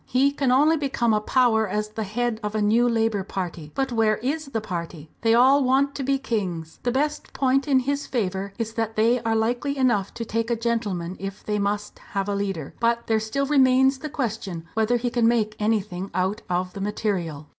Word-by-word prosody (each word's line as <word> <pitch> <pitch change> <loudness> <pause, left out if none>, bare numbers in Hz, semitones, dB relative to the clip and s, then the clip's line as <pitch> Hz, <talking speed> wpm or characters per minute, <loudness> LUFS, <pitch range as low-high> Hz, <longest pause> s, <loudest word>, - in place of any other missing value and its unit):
He 270 +3 +3
can 275 -2 0
only 300 +5 +4
become 265 -6 0
a 210 - +2
power 220 -1 +3
as 210 +2 -2
the 220 +1 -4
head 230 +2 -1
of 210 0 -4
a - - +1
new 230 +4 +3
Labour 225 -3 +1
party. 175 -5 -5
But 270 -1 -1
where 220 -2 +2
is 285 +6 -2
the 245 -5 -2
party? 170 -6 -6
They 225 0 +4
all 265 +4 +5
want 270 +2 +2
to 280 - -5
be 275 +1 +1
kings. 185 -11 -3
The 245 - 0
best 295 +3 -2
point 270 +1 +1
in 265 -2 +4
his 280 +2 -2
favour 195 -4 -2
is 225 -2 -3
that 225 -1 -2
they 230 +3 +3
are 225 -1 0
likely 245 +6 0
enough 235 -7 +2
to 230 - -4
take 230 +1 -2
a 235 - +2
gentleman 210 -7 -2
if 195 0 -7
they 210 -1 -1
must 205 +1 -2
have 195 -1 -1
a 205 - -1
leader. 195 -7 -3
But 235 0 +1
there 220 -1 +2
still 220 +6 -1
remains 265 -1 +4
the 305 - -5
question 215 - -4
whether 220 +2 +2
he 240 0 -2
can 235 -2 +3
make 220 -2 +1
anything 205 -3 -1
out 190 +3 0
of 180 +1 -1
the 200 - -6
material." 185 -8 -2
225 Hz, 210 wpm, -24 LUFS, 200-255 Hz, -, all